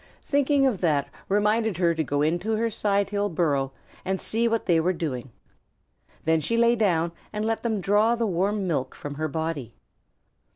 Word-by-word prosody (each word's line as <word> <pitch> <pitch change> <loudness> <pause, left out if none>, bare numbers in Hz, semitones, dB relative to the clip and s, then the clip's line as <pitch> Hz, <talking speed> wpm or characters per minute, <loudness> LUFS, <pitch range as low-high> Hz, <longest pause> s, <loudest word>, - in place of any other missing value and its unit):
Thinking 285 -1 +2
of 240 -8 0
that 150 -5 +1 0.2
reminded 210 0 +2
her 170 -2 +3
to 160 -1 -1
go 145 0 0
into 175 +8 0
her 230 +1 0
sidehill 205 0 0
burrow 145 -6 0 0.3
and 190 0 -1
see 230 +2 0
what 230 -1 0
they 170 -3 +3
were 180 +3 +1
doing. 135 -7 -4 1.0
Then 160 0 +3
she 230 +10 -1
lay 235 0 +4
down 170 -7 +1 0.2
and 210 +1 -2
let 225 0 -1
them 220 -4 -1
draw 210 +5 +3
the 235 -1 0
warm 195 +1 0
milk 145 -7 -2
from 145 - -6
her 155 +2 -2
body. 160 -5 -4
190 Hz, 175 wpm, -25 LUFS, 160-220 Hz, 1.0 s, lay